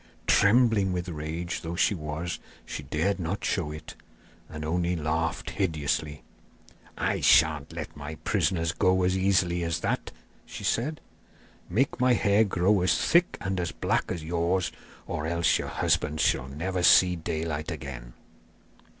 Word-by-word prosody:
Trembling 105 -2 +4
with 90 0 -3
rage 80 +2 -4
though 85 +1 -5
she 95 - +3
was, 80 0 -4 0.3
she - - -6
dared 95 +6 -1
not 90 +4 -3
show 85 -6 -1
it, 75 - -9 0.6
and 75 0 -6
only 85 +2 0
laughed 80 +1 -2
hideously. 75 -4 -2 0.7
'I - - 0
sha'n't 75 -2 +4
let 80 -1 -6
my 75 +1 -7
prisoners 85 0 0
go 95 +2 +2
as 90 +1 +2
easily 95 -2 +2
as 85 -1 -1
all 80 - -1
that!' - - -4 0.3
she - - -9
said. 150 +7 -1 0.7
'Make 125 +10 0
my 125 0 +4
hair 105 -2 +3
grow 95 0 +2
as 90 -3 +2
thick 175 +1 +2
and 95 -1 -2
as 85 - -2
black - - -1
as 85 -3 -4
yours, 85 +2 0 0.3
or 75 - -3
else 85 0 +2
your - - -4
husbands 75 +1 0
shall 65 - +1
never 90 +7 -3
see 90 +1 +6
daylight 80 -2 -3
again. - - -7
85 Hz, 150 wpm, -27 LUFS, 80-95 Hz, 0.7 s, see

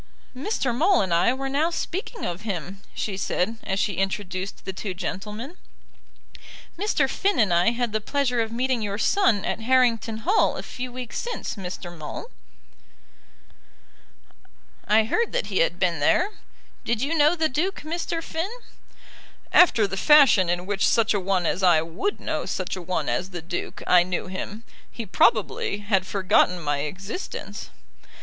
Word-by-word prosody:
"Mr. 265 - -1
Maule 355 +8 +4
and 185 -3 -1
I 170 +7 +4
were 270 +1 -3
now 290 +5 +1
speaking 385 +7 -4
of 175 +2 -4
him," 195 -2 -5
she 200 - -2
said, 195 +3 -1
as 190 0 -2
she 205 -4 0
introduced 195 0 -3
the 190 - -4
two 185 0 -5
gentlemen. 210 - -5 1.2
"Mr. 340 -7 +1
Finn 395 +8 0
and 205 -6 +3
I 175 +5 +4
had 235 -1 -2
the 215 - 0
pleasure 250 0 0
of 225 0 -2
meeting 250 +1 0
your 200 -1 -2
son 225 - +2
at - - -2
Harrington 230 -2 +2
Hall 400 +5 +3
a - - -5
few 250 0 -6
weeks 250 -1 -5
since, 480 - -4
Mr. 180 -3 -7
Maule." 155 -2 -7 2.6
"I 215 +2 +5
heard 450 - 0
that - - 0
he - - +2
had 170 +1 +2
been 175 -4 +1
there. 360 - +3 0.5
Did 235 +1 -1
you 290 +4 0
know 300 +2 +4
the 320 -2 +2
Duke, 335 +8 -2
Mr. 330 +1 -3
Finn?" 325 +5 -3 1.0
"After 245 -12 +6
the 195 -1 -4
fashion 270 - +6
in 175 +1 -1
which 200 0 +1
such 230 -1 +3
a 205 - +1
one 185 -1 0
as 175 - 0
I 175 -4 +5
would 170 - -3
know - - -3
such - - -3
a 185 - -6
one 180 +1 -2
as 185 - -1
the 175 -3 -6
Duke, 175 +1 -5
I 180 -1 +6
knew 180 0 -2
him. 195 +4 -6 0.3
He 230 - -6
probably 215 0 +2
had 195 -2 +1
forgotten 185 -1 +2
my 145 -3 -1
existence." 190 - -6
215 Hz, 165 wpm, -24 LUFS, 185-270 Hz, 2.6 s, After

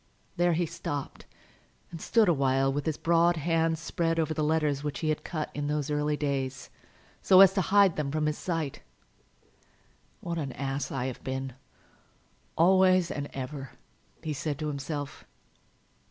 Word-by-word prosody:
There 175 -1 +2
he 170 +2 +1
stopped 145 -4 -6 0.6
and 165 -2 -8
stood 225 -3 +3
a 175 - +5
while 135 -1 +2
with 145 +2 -3
his 155 - -1
broad 170 +1 +3
hand 165 +1 +1
spread 165 +1 -1
over 160 -1 0
the 155 0 -1
letters 150 -2 +1
which 145 -1 -4
he 155 - 0
had 155 - -1
cut 155 -2 -4
in 145 0 -3
those 150 0 -1
early 150 0 0
days, 135 -3 -3 0.5
so 185 - +6
as 190 -1 +8
to 195 - +1
hide 195 -1 +4
them 150 -2 -1
from 155 +1 -1
his 150 0 -1
sight. 165 -6 -3 1.4
"What 170 -1 -4
an 140 -4 -4
ass 135 +2 -3
I 130 -2 -2
have 130 -2 -5
been, 130 0 -4 1.0
always 185 0 +4
and 145 0 -4
ever!" 135 0 -6 0.5
he 155 -2 -2
said 145 0 -3
to 155 +1 -3
himself. 145 0 -5
150 Hz, 165 wpm, -28 LUFS, 140-170 Hz, 1.4 s, as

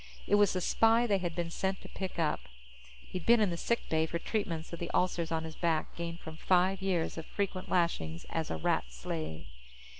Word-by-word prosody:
It - - -1
was 205 -1 +5
the 185 - -1
spy 225 +6 +4
they 200 -4 +2
had 175 -3 -3
been 170 -1 -2
sent 190 +2 -1
to - - -10
pick 190 -1 -5
up. 160 -3 +1 0.7
He'd 180 - -5
been 235 +4 +6
in 210 -4 +3
the - - -1
sick 235 +7 -1
bay 160 0 +2
for 170 - -2
treatments 170 -4 -3
of 170 - -5
the 170 - -3
ulcers 175 -2 +1
on 160 0 0
his 160 -1 -7
back 165 -2 0
gained 170 0 -5
from 160 0 -8
five 185 +2 +3
years 180 -4 0
of 160 - -7
frequent 195 -2 -2
lashings 85 - 0
as 160 -1 -1
a 80 - -2
Rat 80 - +1
slave. 80 +5 -4
170 Hz, 215 wpm, -32 LUFS, 160-190 Hz, 0.7 s, been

